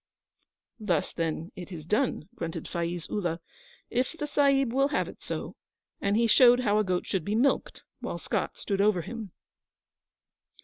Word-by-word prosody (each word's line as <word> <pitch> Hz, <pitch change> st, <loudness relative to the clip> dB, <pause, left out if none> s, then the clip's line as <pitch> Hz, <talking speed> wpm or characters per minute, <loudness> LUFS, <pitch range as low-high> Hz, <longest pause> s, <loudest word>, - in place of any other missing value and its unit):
'Thus, 180 Hz, -8 st, 0 dB
then, 165 Hz, 0 st, -2 dB
it 180 Hz, +1 st, -8 dB
is 160 Hz, -4 st, -7 dB
done,' 210 Hz, -, 0 dB
grunted 165 Hz, -1 st, -5 dB
Faiz 170 Hz, 0 st, -3 dB
Ullah, 175 Hz, -5 st, -2 dB, 0.5 s
'if 255 Hz, +4 st, 0 dB
the 300 Hz, -, -2 dB
Sahib 275 Hz, -4 st, +3 dB
will 275 Hz, +1 st, +4 dB
have 290 Hz, -, 0 dB
it -, -, -11 dB
so'; -, -, -5 dB, 0.5 s
and 200 Hz, +1 st, +2 dB
he 235 Hz, -, +4 dB
showed 245 Hz, +2 st, +7 dB
how 210 Hz, -3 st, +3 dB
a -, -, +3 dB
goat 185 Hz, -2 st, -1 dB
should 190 Hz, -4 st, -1 dB
be 205 Hz, +5 st, -1 dB
milked, 265 Hz, +5 st, +1 dB, 0.2 s
while -, -, -4 dB
Scott -, -, -2 dB
stood 195 Hz, -1 st, -1 dB
over 200 Hz, -4 st, +3 dB
him. 225 Hz, -3 st, -7 dB
205 Hz, 165 wpm, -28 LUFS, 175-245 Hz, 0.5 s, showed